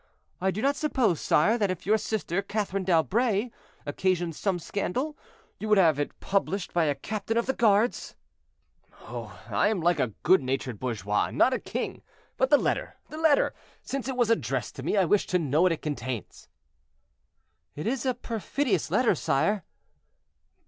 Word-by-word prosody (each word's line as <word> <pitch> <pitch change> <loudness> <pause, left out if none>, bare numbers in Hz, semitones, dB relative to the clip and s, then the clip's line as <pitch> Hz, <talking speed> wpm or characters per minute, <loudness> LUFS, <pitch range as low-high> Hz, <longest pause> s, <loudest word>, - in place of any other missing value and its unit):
I 190 - +2
do 200 +3 -3
not 280 +1 +3
suppose, 255 - +1
sire, 215 +10 +3
that 205 -2 +2
if 185 -2 -4
your 215 +3 +3
sister, 200 -4 -2
Catherine 200 -1 -2
d'Albret, 205 +6 +2 0.3
occasioned 175 +2 0
some 195 +1 0
scandal, 250 - -3 0.4
you 215 - -4
would 210 - +5
have 160 -6 +4
it 145 - -3
published 195 -1 -1
by 170 -2 +3
a 145 -2 +1
captain 215 +9 -3
of 235 - +2
the 265 - 0
guards." 220 0 +2 0.9
"Oh! - - -8
I - - +2
am 210 -2 0
like 170 -1 +2
a 130 - +2 0.2
good 185 0 +5
natured 130 -3 -3
bourgeois, 105 -5 -1
and - - -8
not 260 - +5
a - - 0
king; - - -4 0.3
but 260 - +1
the 290 - +7
letter, - - -1 0.2
the 310 - -6
letter; 315 -3 +3 0.3
since 275 -1 -4
it 260 -2 -3
was 240 -2 +3
addressed 130 - -1
to - - -5
me, 160 +9 0
I 190 - +4
wish 200 +4 +2
to 180 - +2
know 155 -2 +1
what 185 0 +4
it 165 - -3
contains." 130 - -5 1.3
"It 150 - -5
is 245 +2 -1
a 255 -2 0
perfidious 245 +4 -1
letter, 250 -4 +3
sire." 185 +6 0
195 Hz, 175 wpm, -27 LUFS, 160-230 Hz, 1.3 s, the